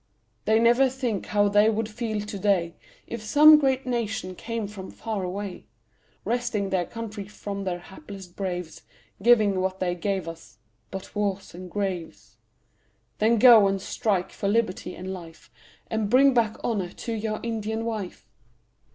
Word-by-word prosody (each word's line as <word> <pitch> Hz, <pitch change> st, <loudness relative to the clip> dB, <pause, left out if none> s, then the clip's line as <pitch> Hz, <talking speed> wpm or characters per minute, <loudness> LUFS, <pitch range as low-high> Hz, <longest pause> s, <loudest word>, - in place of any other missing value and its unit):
They 220 Hz, +1 st, +4 dB
never 240 Hz, +3 st, +5 dB
think 245 Hz, -6 st, -3 dB
how 205 Hz, 0 st, +3 dB
they 205 Hz, +2 st, +5 dB
would 220 Hz, 0 st, -1 dB
feel 220 Hz, -1 st, -3 dB
to 205 Hz, -1 st, -6 dB
day, 185 Hz, -4 st, +1 dB, 0.3 s
If 235 Hz, -, -6 dB
some 300 Hz, +7 st, +7 dB
great 270 Hz, -2 st, +1 dB
nation 220 Hz, -6 st, -2 dB
came 230 Hz, +2 st, -4 dB
from 195 Hz, -2 st, -9 dB
far 220 Hz, -3 st, -4 dB
away, 190 Hz, +1 st, -5 dB, 0.6 s
Wresting 235 Hz, -5 st, -1 dB
their 180 Hz, -2 st, 0 dB
country 215 Hz, -3 st, -6 dB
from 200 Hz, -1 st, -6 dB
their 180 Hz, -2 st, -1 dB
hapless 190 Hz, +2 st, -11 dB
braves, 180 Hz, -2 st, -5 dB, 0.4 s
Giving 210 Hz, -4 st, +4 dB
what 190 Hz, 0 st, -2 dB
they 180 Hz, -1 st, 0 dB
gave 190 Hz, 0 st, -2 dB
us 165 Hz, 0 st, -10 dB, 0.3 s
but 190 Hz, 0 st, -8 dB
wars 200 Hz, -2 st, -2 dB
and 180 Hz, +1 st, -9 dB
graves. 185 Hz, -3 st, -4 dB, 0.8 s
Then 225 Hz, +2 st, +4 dB
go 225 Hz, -3 st, +8 dB
and 195 Hz, 0 st, 0 dB
strike 190 Hz, -1 st, -1 dB
for 200 Hz, -, -3 dB
liberty 200 Hz, -4 st, 0 dB
and 190 Hz, +1 st, -6 dB
life, 165 Hz, -9 st, -11 dB, 0.3 s
And 220 Hz, -2 st, -2 dB
bring 270 Hz, +3 st, +6 dB
back 225 Hz, -3 st, +1 dB
honour 200 Hz, -6 st, -1 dB
to 230 Hz, -, -5 dB
your 215 Hz, -1 st, -2 dB
Indian 225 Hz, -1 st, -3 dB
wife. 215 Hz, -5 st, -5 dB
205 Hz, 155 wpm, -26 LUFS, 190-230 Hz, 0.8 s, go